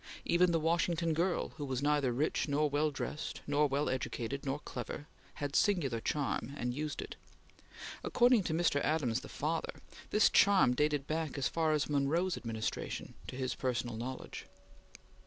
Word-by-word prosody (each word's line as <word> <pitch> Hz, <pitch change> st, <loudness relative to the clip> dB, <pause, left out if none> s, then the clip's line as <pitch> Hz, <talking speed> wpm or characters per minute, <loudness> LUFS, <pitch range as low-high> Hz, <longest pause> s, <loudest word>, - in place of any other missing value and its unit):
Even 175 Hz, +1 st, +4 dB
the 165 Hz, -, +2 dB
Washington 170 Hz, +1 st, +1 dB
girl, 175 Hz, +3 st, 0 dB
who 145 Hz, -, -4 dB
was 130 Hz, 0 st, -2 dB
neither 145 Hz, -3 st, +2 dB
rich 145 Hz, +7 st, 0 dB
nor 150 Hz, +1 st, +2 dB
well 145 Hz, +2 st, +1 dB
dressed 150 Hz, +2 st, -5 dB
nor 145 Hz, +1 st, +3 dB
well 140 Hz, +2 st, 0 dB
educated 130 Hz, 0 st, -3 dB
nor 135 Hz, +1 st, 0 dB
clever, 145 Hz, -, -6 dB, 0.3 s
had 145 Hz, -1 st, -4 dB
singular 155 Hz, -, +2 dB
charm, 140 Hz, 0 st, -2 dB
and 125 Hz, -2 st, -2 dB
used 150 Hz, +2 st, -3 dB
it. -, -, -9 dB, 0.9 s
According 245 Hz, -2 st, +4 dB
to 160 Hz, -, -1 dB
Mr. 165 Hz, -4 st, +2 dB
Adams 145 Hz, -7 st, +1 dB
the -, -, -10 dB
father, 160 Hz, +3 st, -2 dB, 0.3 s
this 210 Hz, -, +4 dB
charm 195 Hz, -11 st, +5 dB
dated 150 Hz, +1 st, +1 dB
back 155 Hz, -1 st, -2 dB
as 135 Hz, -, +1 dB
far 160 Hz, -2 st, +1 dB
as 150 Hz, -1 st, +1 dB
Monroe's 155 Hz, +6 st, +1 dB
administration, 110 Hz, -2 st, -4 dB
to -, -, -6 dB
his 130 Hz, -1 st, -1 dB
personal 125 Hz, -3 st, -2 dB
knowledge. 125 Hz, +3 st, -6 dB
145 Hz, 160 wpm, -33 LUFS, 135-165 Hz, 0.9 s, charm